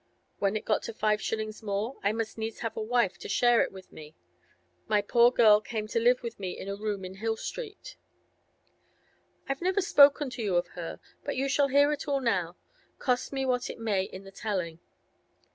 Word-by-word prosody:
When 200 Hz, +1 st, +1 dB
it 215 Hz, -, -3 dB
got 215 Hz, -, +1 dB
to 225 Hz, -, -7 dB
five 215 Hz, -1 st, +1 dB
shillings 215 Hz, -1 st, -3 dB
more, 215 Hz, +4 st, -3 dB
I 200 Hz, -, +2 dB
must 225 Hz, 0 st, -3 dB
needs 225 Hz, 0 st, -5 dB
have 225 Hz, -, -3 dB
a -, -, -3 dB
wife 225 Hz, -3 st, +1 dB
to -, -, -8 dB
share 240 Hz, +2 st, +4 dB
it -, -, 0 dB
with 190 Hz, -1 st, -13 dB
me. 155 Hz, 0 st, -12 dB, 0.7 s
My 210 Hz, -, +3 dB
poor 235 Hz, +4 st, +5 dB
girl 215 Hz, -4 st, +6 dB
came 215 Hz, -1 st, -4 dB
to 230 Hz, -, +1 dB
live 245 Hz, +2 st, +3 dB
with 230 Hz, -2 st, -6 dB
me 185 Hz, -2 st, -4 dB
in -, -, -7 dB
a 200 Hz, -, -3 dB
room 205 Hz, -2 st, -3 dB
in 185 Hz, +1 st, -9 dB
Hill 225 Hz, +2 st, -1 dB
Street. -, -, -7 dB, 1.5 s
I've 275 Hz, +2 st, -3 dB
never 370 Hz, +3 st, +1 dB
spoken 285 Hz, -5 st, +5 dB
to 245 Hz, -, -6 dB
you 200 Hz, -5 st, 0 dB
of 175 Hz, 0 st, +1 dB
her, 170 Hz, -1 st, -7 dB, 0.2 s
but 285 Hz, -, -3 dB
you 270 Hz, +2 st, 0 dB
shall 280 Hz, +1 st, +3 dB
hear 285 Hz, +2 st, +4 dB
it 295 Hz, 0 st, -4 dB
all 280 Hz, -1 st, +1 dB
now, 185 Hz, -9 st, -1 dB, 0.4 s
cost 250 Hz, -2 st, 0 dB
me 270 Hz, -1 st, -1 dB
what 250 Hz, -1 st, 0 dB
it -, -, -6 dB
may 215 Hz, -4 st, 0 dB
in 190 Hz, 0 st, -10 dB
the 195 Hz, -, -12 dB
telling. 185 Hz, -5 st, -3 dB
225 Hz, 210 wpm, -29 LUFS, 200-255 Hz, 1.5 s, girl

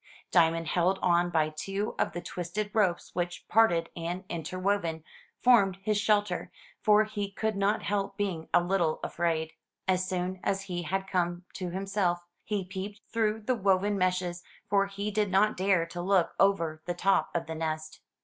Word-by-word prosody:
Diamond 165 Hz, -1 st, +3 dB
held 180 Hz, +3 st, +2 dB
on 175 Hz, 0 st, +3 dB
by 160 Hz, -3 st, +2 dB
two 195 Hz, +7 st, -3 dB
of -, -, +1 dB
the 175 Hz, -, -4 dB
twisted 180 Hz, +4 st, -4 dB
ropes 195 Hz, -6 st, +1 dB
which, 175 Hz, 0 st, -3 dB
parted 170 Hz, -7 st, +3 dB
and 175 Hz, +2 st, -4 dB
interwoven, 170 Hz, 0 st, -1 dB, 0.4 s
formed 200 Hz, -7 st, +5 dB
his 215 Hz, +1 st, +1 dB
shelter, 205 Hz, -3 st, +1 dB, 0.3 s
for 210 Hz, 0 st, +5 dB
he 210 Hz, -2 st, -4 dB
could 220 Hz, +2 st, -2 dB
not 200 Hz, +2 st, +1 dB
help 200 Hz, -1 st, -1 dB
being 185 Hz, -6 st, -2 dB
a 175 Hz, -, +4 dB
little 175 Hz, -3 st, +1 dB
afraid. 160 Hz, -2 st, -1 dB, 0.4 s
As 185 Hz, 0 st, +1 dB
soon 185 Hz, 0 st, -2 dB
as 195 Hz, 0 st, 0 dB
he 180 Hz, -3 st, -4 dB
had 190 Hz, +3 st, -2 dB
come 175 Hz, -2 st, -1 dB
to 185 Hz, -2 st, -4 dB
himself, 185 Hz, -2 st, -1 dB, 0.2 s
he 205 Hz, -3 st, -2 dB
peeped 200 Hz, +3 st, -6 dB
through 220 Hz, -1 st, +1 dB
the 255 Hz, +5 st, +1 dB
woven 200 Hz, -1 st, +2 dB
meshes, 180 Hz, -2 st, 0 dB, 0.3 s
for 200 Hz, 0 st, +3 dB
he 200 Hz, +1 st, -4 dB
did 210 Hz, -1 st, +1 dB
not 200 Hz, +3 st, +3 dB
dare 185 Hz, -2 st, +2 dB
to 175 Hz, +1 st, -6 dB
look 185 Hz, -1 st, +2 dB
over 170 Hz, -6 st, +2 dB
the 175 Hz, -, -2 dB
top 195 Hz, +2 st, +2 dB
of 170 Hz, -, 0 dB
the 160 Hz, -, -5 dB
nest. 155 Hz, -1 st, -4 dB
185 Hz, 170 wpm, -29 LUFS, 175-200 Hz, 0.4 s, formed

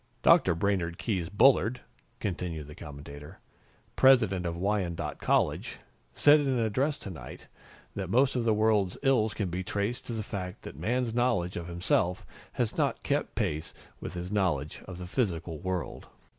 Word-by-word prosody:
"Dr. 90 Hz, -, +5 dB
Brainard 85 Hz, -2 st, 0 dB
Keyes 90 Hz, -7 st, -2 dB
Bullard," 120 Hz, +2 st, +4 dB, 0.4 s
continued 85 Hz, -5 st, -3 dB
the 75 Hz, -, -11 dB
commentator, 70 Hz, 0 st, -10 dB, 0.6 s
"President 110 Hz, -9 st, +4 dB
of 85 Hz, 0 st, -3 dB
Wyandotte 95 Hz, -2 st, -1 dB
College, -, -, +1 dB, 0.4 s
said 150 Hz, +1 st, +6 dB
in 145 Hz, -, -1 dB
an 130 Hz, -2 st, +1 dB
address 130 Hz, +7 st, +1 dB
tonight 80 Hz, -11 st, -9 dB, 0.5 s
that -, -, -4 dB
most 130 Hz, +6 st, +3 dB
of 125 Hz, -, +1 dB
the 115 Hz, -, +2 dB
world's 105 Hz, -3 st, +2 dB
ills 120 Hz, -6 st, +2 dB
can 95 Hz, -5 st, -2 dB
be 90 Hz, +2 st, -2 dB
traced 100 Hz, +6 st, -3 dB
to 120 Hz, -, -4 dB
the 110 Hz, -1 st, -3 dB
fact 95 Hz, -3 st, -6 dB
that -, -, -8 dB
Man's 115 Hz, -, -1 dB
knowledge 115 Hz, -8 st, +1 dB
of 85 Hz, -1 st, -5 dB
himself 90 Hz, +1 st, 0 dB, 0.3 s
has -, -, -1 dB
not -, -, 0 dB
kept -, -, -1 dB
pace 75 Hz, +1 st, -2 dB, 0.2 s
with -, -, -7 dB
his 90 Hz, +2 st, -5 dB
knowledge 85 Hz, -8 st, 0 dB
of 95 Hz, -2 st, -7 dB
the 90 Hz, -, -7 dB
physical 85 Hz, -, -2 dB
world." 95 Hz, 0 st, -4 dB
95 Hz, 160 wpm, -29 LUFS, 85-115 Hz, 0.6 s, said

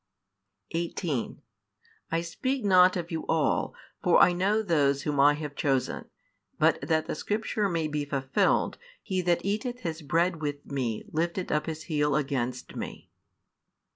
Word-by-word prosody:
18 165 Hz, -, -3 dB, 0.7 s
I 165 Hz, 0 st, +1 dB
speak 255 Hz, +9 st, -2 dB
not 185 Hz, -1 st, +6 dB
of 170 Hz, -1 st, -5 dB
you 160 Hz, -1 st, -3 dB
all, 160 Hz, -2 st, +1 dB, 0.3 s
for -, -, +4 dB
I 180 Hz, -, +6 dB
know 200 Hz, +5 st, +1 dB
those 145 Hz, -6 st, +2 dB
whom 145 Hz, -2 st, -1 dB
I 145 Hz, +1 st, +6 dB
have 150 Hz, -1 st, -6 dB
chosen: 135 Hz, -3 st, 0 dB, 0.5 s
but -, -, +3 dB
that 160 Hz, -1 st, +1 dB
the -, -, -3 dB
scripture 210 Hz, +3 st, -1 dB
may 165 Hz, -3 st, 0 dB
be 150 Hz, -1 st, -2 dB
fulfilled, 135 Hz, -2 st, +1 dB, 0.2 s
He 190 Hz, -3 st, -1 dB
that 175 Hz, 0 st, +1 dB
eateth 240 Hz, +5 st, -2 dB
his 165 Hz, -1 st, -4 dB
bread 165 Hz, +2 st, +1 dB
with 145 Hz, -1 st, -3 dB
Me 125 Hz, -6 st, -2 dB
lifted 170 Hz, +3 st, -1 dB
up 150 Hz, +2 st, 0 dB
his 160 Hz, 0 st, -4 dB
heel 150 Hz, -3 st, +1 dB
against 130 Hz, -4 st, -2 dB
Me. -, -, -7 dB
160 Hz, 150 wpm, -28 LUFS, 145-180 Hz, 0.7 s, not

